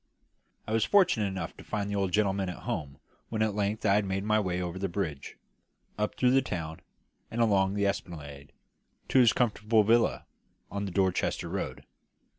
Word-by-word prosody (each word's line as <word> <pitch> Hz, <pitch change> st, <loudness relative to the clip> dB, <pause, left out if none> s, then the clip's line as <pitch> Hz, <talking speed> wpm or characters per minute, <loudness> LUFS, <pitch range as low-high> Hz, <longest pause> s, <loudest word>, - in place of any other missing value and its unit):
I -, -, -6 dB
was 110 Hz, -1 st, +2 dB
fortunate 180 Hz, -, +4 dB
enough 95 Hz, -1 st, -5 dB
to -, -, -11 dB
find 105 Hz, -2 st, -3 dB
the 100 Hz, -, -3 dB
old 95 Hz, -2 st, 0 dB
gentleman 100 Hz, -1 st, +1 dB
at 90 Hz, -, -8 dB
home 70 Hz, -2 st, -4 dB, 0.3 s
when 110 Hz, -1 st, 0 dB
at 110 Hz, -1 st, 0 dB
length 105 Hz, +1 st, -1 dB
I 100 Hz, -, +5 dB
had 105 Hz, 0 st, +2 dB
made 95 Hz, 0 st, -2 dB
my 110 Hz, +1 st, +2 dB
way 90 Hz, -3 st, -1 dB
over 90 Hz, 0 st, -4 dB
the 100 Hz, 0 st, -1 dB
bridge, 85 Hz, -7 st, -4 dB, 0.6 s
up 105 Hz, 0 st, -2 dB
through 125 Hz, -1 st, +3 dB
the 135 Hz, +1 st, +5 dB
town, 80 Hz, -9 st, -5 dB, 0.5 s
and 115 Hz, -, -5 dB
along 100 Hz, -4 st, +3 dB
the 100 Hz, 0 st, +1 dB
esplanade, 75 Hz, -7 st, -4 dB, 0.6 s
to 130 Hz, -, +4 dB
his 120 Hz, -3 st, +7 dB
comfortable 110 Hz, -2 st, +2 dB
villa 115 Hz, +3 st, +2 dB, 0.5 s
on 100 Hz, 0 st, -3 dB
the 95 Hz, -, -4 dB
Dorchester 95 Hz, -1 st, 0 dB
road. -, -, -4 dB
100 Hz, 185 wpm, -29 LUFS, 95-110 Hz, 0.6 s, his